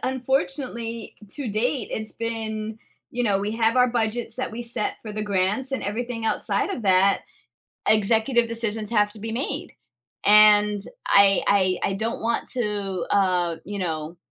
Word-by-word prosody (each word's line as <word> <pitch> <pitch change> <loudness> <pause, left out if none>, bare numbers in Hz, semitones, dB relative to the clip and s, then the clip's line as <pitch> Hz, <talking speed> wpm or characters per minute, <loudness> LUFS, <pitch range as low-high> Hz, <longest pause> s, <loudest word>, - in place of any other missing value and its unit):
unfortunately, 255 -3 -2 0.2
to 280 -5 -4
date, 225 +3 -1
it's 220 0 -3
been, 220 -1 -4 0.3
you 245 0 -1
know, 200 -3 +2
we 205 +2 -2
have 225 +1 +1
our 250 0 +5
budgets 235 0 -1
that 255 - -3
we 235 +2 -5
set 235 -3 -1
for 215 - -7
the 215 0 -3
grants 205 +6 0
and 265 - -2
everything 230 +2 -4
outside 225 - 0
of 255 - -4
that, 195 0 +4 0.7
executive 225 +3 +3
decisions 225 -2 -1
have 210 -2 +2
to 215 - -12
be 225 +2 -5
made, 275 +5 -3 0.6
and 210 0 +6 0.3
I 200 -1 +5
I 185 -2 +2
I - - -2
don't 220 +4 -3
want 230 +1 -1
to, 205 -6 -2
uh, 180 -4 +2
you 205 0 -5
know, 160 -1 -4
220 Hz, 160 wpm, -24 LUFS, 205-235 Hz, 0.7 s, and